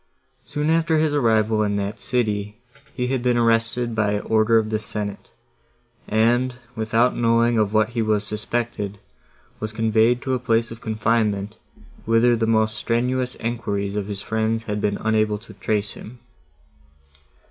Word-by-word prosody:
Soon 150 +2 -1
after 165 0 +2
his 155 -1 +1
arrival 110 -5 +2
in 105 -1 0
that 100 +1 -3
city, 105 -2 -1 0.4
he 125 0 -1
had 130 0 -1
been 120 -1 +2
arrested 115 +1 +2
by 105 -2 +1
order 110 +1 +3
of 110 -1 0
the 110 - 0
Senate, 105 -2 -5 0.8
and, 120 +4 +2 0.2
without 115 +2 +1
knowing 115 0 +2
of 105 -2 +1
what 110 0 +2
he 120 -1 -2
was 110 -1 +1
suspected, 105 -1 -3 0.6
was 110 0 -4
conveyed 110 +2 +2
to 130 - -1
a 130 - 0
place 115 -1 0
of 115 0 -9
confinement, 110 -2 0 0.5
whither 115 +2 +4
the 115 -1 0
most 110 -1 +2
strenuous 125 +2 -1
enquiries 105 -4 -3
of 100 -1 -2
his 100 -1 -5
friends 110 +1 -1
had 105 -2 -3
been 100 -1 0
unable 110 -1 +1
to 110 +3 -14
trace 105 -1 -1
him. 120 +3 -11
110 Hz, 155 wpm, -22 LUFS, 105-120 Hz, 0.8 s, whither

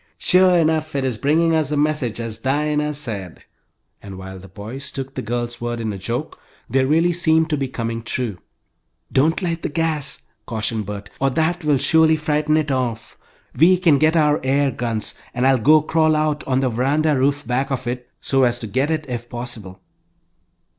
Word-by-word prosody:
"Sure 185 0 +4
enough 155 -2 +1
it 135 -1 0
is 120 -5 -2
bringing 165 +5 +2
us 155 -3 +2
a 150 - -1
message, 145 -6 0
as 115 -2 -4
Dinah 150 +2 0
said," 100 - -4 0.6
and 100 -2 -9
while 95 0 -8
the 95 - -12
boys 110 +8 -7
took 135 0 -6
the - - -4
girl's 120 +1 -3
words 120 0 -3
in 110 -2 -3
a 95 - -7
joke, 120 +10 -4 0.3
they 135 0 +2
really 165 +6 +2
seemed 160 -1 +2
to - - +3
be 135 -1 -2
coming 115 -2 -4
true. 115 -4 -3 0.7
"Don't 160 +8 +2
light 165 -2 -2
the - - -2
gas," 155 -2 -2 0.2
cautioned 110 -2 -2
Bert, 100 -1 -7
"or 135 - +2
that 160 +5 0
will 150 -2 +3
surely 160 +3 +4
frighten 155 0 +1
it 150 -2 0
off. 120 -4 -2 0.4
We 175 +7 +5
can 165 -6 +3
get 155 +2 +3
our 150 -1 +3
air 135 +1 +2
guns, 115 -3 -3 0.2
and 125 +1 +1
I'll 135 -1 +4
go 150 +7 +5
crawl 155 0 +2
out 150 -1 0
on 130 0 +1
the 130 - +1
veranda 145 +6 +1
roof 140 +2 +1
back 130 +2 -1
of 135 -4 -3
it, 125 0 -4
so 135 -1 +1
as 120 -1 +2
to 120 - -6
get 130 +8 0
it 155 -2 -1
if 120 -2 -5
possible." 110 -6 -6
135 Hz, 195 wpm, -21 LUFS, 120-155 Hz, 0.7 s, We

